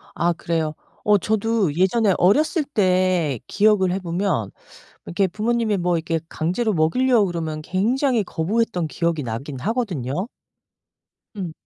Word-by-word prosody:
아 175 +1 +2
그래요? 165 -2 -2 0.3
어 210 0 +5
저도 215 -4 0
예전에 190 +4 +2
어렸을 300 - +3
때 185 - +1
기억을 205 -3 +3
해 190 - -1
보면 170 - -1 0.6
이렇게 190 +3 +1
부모님이 215 +3 0
뭐 175 -1 +1
이렇게 165 0 -2
강제로 185 +10 -1
먹이려고 210 +7 +3
그러면 160 -3 -4
굉장히 235 - +1
거부했던 180 0 -1
기억이 170 0 -1
나긴 130 +4 -5
하거든요. 185 - -2 1.1
음. 180 -5 -4
185 Hz, 300 characters per minute, -22 LUFS, 165-220 Hz, 1.1 s, 어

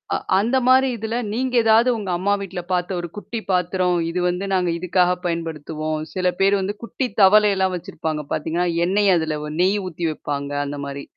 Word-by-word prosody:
அ - - +2 0.2
அந்த 235 +6 +1
மாரி 260 +1 +5
இதுல 220 +1 -4 0.2
நீங்க 250 +3 -1
ஏதாவது 225 +2 +4
உங்க 205 -4 -5
அம்மா 200 +3 +1
வீட்ல 190 -2 -5
பார்த்த 180 0 0
ஒரு 175 - -4
குட்டி 225 +2 -5
பாத்திரம், 180 0 +1
இது 175 +2 -2
வந்து 180 +2 -2
நாங்க 180 -2 +1
இதுக்காக 180 +1 +2
பயன்படுத்துவோம். 155 -2 -3 0.2
சில 185 -1 0
பேர் 195 +1 +4
வந்து 195 +2 -2
குட்டி 255 +3 -3 0.2
தவளைல்லாம் 195 -1 +5
வச்சிருப்பாங்க 160 -4 -4
பார்த்தீங்கன்னா, 165 +3 -1 0.2
எண்ணெய் 200 +2 +3
அதுல 160 -2 -1 0.2
நெய் 190 +3 +3
ஊத்தி 170 -1 -4
வைப்பாங்க 145 -2 -4
அந்த 145 +1 -5
மாரி. 140 0 -6
180 Hz, 170 wpm, -21 LUFS, 165-205 Hz, 0.2 s, மாரி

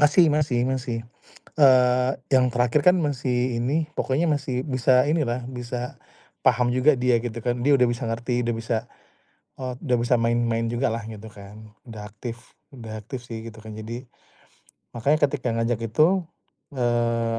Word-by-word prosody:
Masih 150 +4 +6
masih 145 -5 +1
masih. 130 -2 -2 0.6
Eee, 125 -2 +5 0.2
yang 130 -1 +5
terakhir 120 +3 +2
kan 180 +1 +7
masih 125 -4 -1
ini, 145 +7 0
pokoknya 140 +4 0
masih 135 -4 -1
bisa 130 -2 +3
ini 155 +1 +1
lah, 120 0 -3
bisa 125 -1 -6 0.4
paham 125 -1 +3
juga 130 +4 +4
dia 125 -2 +2
gitu 120 -1 -5
kan, 120 0 -1
dia 140 +3 +4
udah 125 - +4
bisa 120 -1 -1
ngerti 120 +2 -1
udah 120 0 0
bisa, 115 0 -2 0.8
eee, 130 -1 -4
udah 125 -2 +3
bisa 120 +1 +3
main-main 115 0 +1
juga 120 +2 0
lah 115 - -2
gitu 110 0 -9
kan 105 +2 -13 0.2
udah 105 -2 -9
aktif, 120 +4 -9 0.2
udah 110 -3 -7
aktif 120 +4 -8
sih 115 -2 -7
gitu 110 -1 -11
kan 110 - -9
jadi 110 +3 -7 1.0
makanya 145 +4 +2
ketika 130 -5 -2
ngajak 115 0 0
itu, 165 - +2 0.5
eee, 115 -2 0
125 Hz, 160 wpm, -24 LUFS, 115-130 Hz, 1.0 s, kan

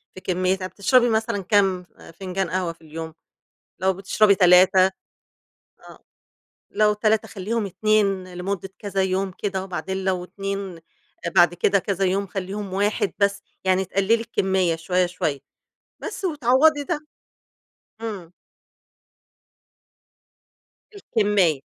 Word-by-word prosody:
في 185 - -10
كمّياتها، 185 +1 -1
بتشربي 240 +6 +3
مثلًا 220 -3 -1
كام 190 -2 +2 0.3
فنجان 190 -1 -2
قهوة 180 -2 -2
في 165 - -30
اليوم، 160 0 -8 0.7
لو 190 0 +2
بتشربي 200 +2 +3
3 185 0 +6 1.0
آه - - -15 0.7
لو 210 0 +3
3 215 +1 +1
خلّيهم 210 +2 -3
2 195 -2 0
لمُدّة 190 +1 -4
كذا 195 -2 -1
يوم 190 0 -1
كده، 190 -2 -2
وبعدين 190 +1 -4
لو 185 -2 0
2 195 -1 -5 0.6
بعد 175 0 +6
كده 195 +3 +2
كذا 195 0 -1
يوم 195 +2 0
خلّيهم 195 +1 -5
1 205 -1 0
بس 200 0 +1 0.2
يعني 190 0 +2
تقلّلي 195 +4 +1
الكميّة 190 -6 0
شوية، 180 +3 0
شوية 160 -5 -2 0.6
بس - - -6
وتعوّضي 290 0 +3
ده. 335 -2 -2 1.0
امم. 195 -7 -6 2.6
الكمّية. 205 - +1
195 Hz, 115 wpm, -23 LUFS, 185-210 Hz, 2.6 s, 3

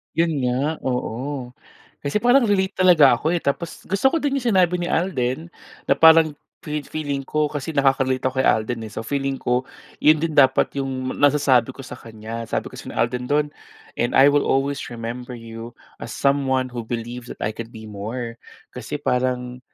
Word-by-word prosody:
Iyon 165 0 +2
nga, 140 +6 -1
oo. 125 +1 -3 0.5
Kasi 145 +9 -1
parang 245 +1 +5
relate 195 -2 +1
talaga 155 -9 +6
ako 160 +5 0
eh, 175 - 0
tapos 165 +4 -3
gusto 195 +7 -2
ko - - +2
din 280 -1 0
'yong 240 -5 0
sinabi 180 -1 +3
ni 175 - -2
Alden 160 -2 -1 0.4
na - - +4
parang 160 -1 +7 0.3
fe-feeling 150 -1 -3
ko 155 0 0
kasi 145 +1 -4
nakaka-relate 135 -2 +2
ako 130 0 0
kay - - +2
Alden, 110 +1 0
eh. 105 - -9
So - - -4
feeling 135 +2 -2
ko, 125 +1 0 0.3
'yon 155 0 +5
din 160 -3 -2
dapat 135 -1 +5
'yong 130 -1 -3
nasasabi 140 -4 +3
ko 135 - -10
sa - - -9
kanya. 115 +1 -7
Sabi - - -2
kasi - - -10
ni - - -7
Alden 125 +2 0
do'n, 150 0 +2 0.5
"And 120 - 0
I 140 +2 +7
will 145 0 +2
always 135 +1 +1
remember 120 +2 -6
you 115 0 -9 0.3
as - - -7
someone 135 -2 +1
who 120 -2 -6
believes 120 +1 -5
that - - -20
I 110 - 0
can 115 +1 -7
be 110 0 -10
more" 115 +3 -5 0.3
kasi - - -6
parang 125 0 -1
135 Hz, 180 wpm, -22 LUFS, 120-155 Hz, 0.5 s, parang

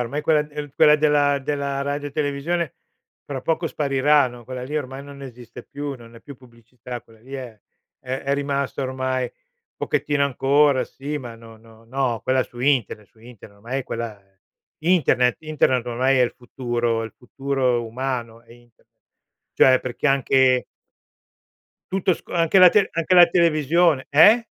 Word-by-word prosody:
ormai 125 +5 -3
quella 155 0 +3
d 150 -1 -8
quella 150 -1 +6
della 145 -2 +2
della 140 0 -2
radio 145 +1 -3
televisione, 150 +4 -2 0.5
fra 135 -3 -5
poco 165 +1 -1
spariranno; 135 -4 +1
quella 130 +1 -7
lì 150 +4 -3
ormai 135 0 -7
non 140 -1 -12
esiste 125 -2 -11
più, 145 +2 -6
non 120 -2 -15
è 115 - -13
più 140 - -11
pubblicità, 120 0 -11
quella 110 -1 -22
lì 135 +3 -11
è 125 -5 -8 0.4
è 130 +1 -4
è 140 - -1
rimasta 140 -1 -2
ormai 130 -1 -2
un - - -15
pochettino, 145 -1 0
ancora 140 +1 +2
sì, 145 +2 -6
ma 120 -4 -9
no 115 -1 -15
no 115 0 -19
no, 125 -1 -2
quella 130 0 +2
su 120 0 -12
internet, 125 -6 0
su - - -29
internet 110 -3 -15
ormai 125 +6 -4
è - - -9
quella 115 -4 -5 0.6
internet, 155 -7 +2
internet 150 -6 0
ormai 130 +2 +1
è 125 - +4
il 120 - 0
futuro, 120 -2 -2
il 110 - -7
futuro 130 -1 -2
umano 120 -1 -4
è 115 0 -19
internet, 120 -1 -23 0.6
cioè, 130 -1 +5
perché 130 +3 -3
anche 130 -2 +3 1.3
Tutto 190 -1 +1
sco 170 - -8
anche 170 +2 +3
la 185 - +9
tele 200 +2 +2
anche 165 +2 0
la 175 -1 +9
televisione 165 -3 +2
eh? 210 +11 +6
135 Hz, 165 wpm, -22 LUFS, 120-145 Hz, 1.3 s, la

